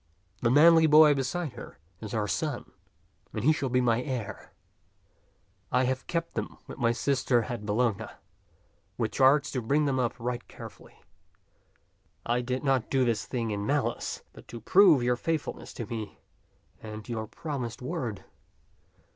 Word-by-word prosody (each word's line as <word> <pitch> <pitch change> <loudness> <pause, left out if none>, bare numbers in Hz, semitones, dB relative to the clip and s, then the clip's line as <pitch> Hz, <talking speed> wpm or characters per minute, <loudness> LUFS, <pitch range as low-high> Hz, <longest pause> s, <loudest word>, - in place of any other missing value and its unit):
The 115 - +2
manly 160 +4 +7
boy 150 0 +7
beside 140 +3 -2
her - - -10 0.2
is 110 +1 -6
our 105 -1 0
son, - - -3 0.6
and - - -3
he 155 +4 +5
shall 140 -3 -2
be 125 +1 +2
my 120 -1 +2
heir. 125 -5 -5 1.2
I 125 +1 +3
have 130 +1 -2
kept 170 -1 -2
them - - -4
with - - -10
my 115 -2 +3
sister 125 0 +1
at 105 -2 -6
Bologna, 110 0 0 0.9
with 110 -3 -1
charge 135 +4 +4
to 130 - -2
bring 145 +6 +1
them 135 -2 0
up 120 -2 0
right 120 +1 -4
carefully. - - -12 1.3
I 120 +1 +1
did 125 +2 -3
not 135 -4 +1
do 130 -2 +2
this 115 -2 -1
thing 115 -4 -2
in 100 -1 -2
malice, 145 +5 -1
but - - -15
to 115 - -8
prove 165 - +5
your 125 0 +1
faithfulness 160 +3 -3
to 115 - -5
me 110 -1 -6 0.6
and 110 -1 -8
to - - -8
your 110 -1 -3
promised 130 -3 -5
word." 125 - -4
125 Hz, 160 wpm, -28 LUFS, 115-140 Hz, 1.3 s, manly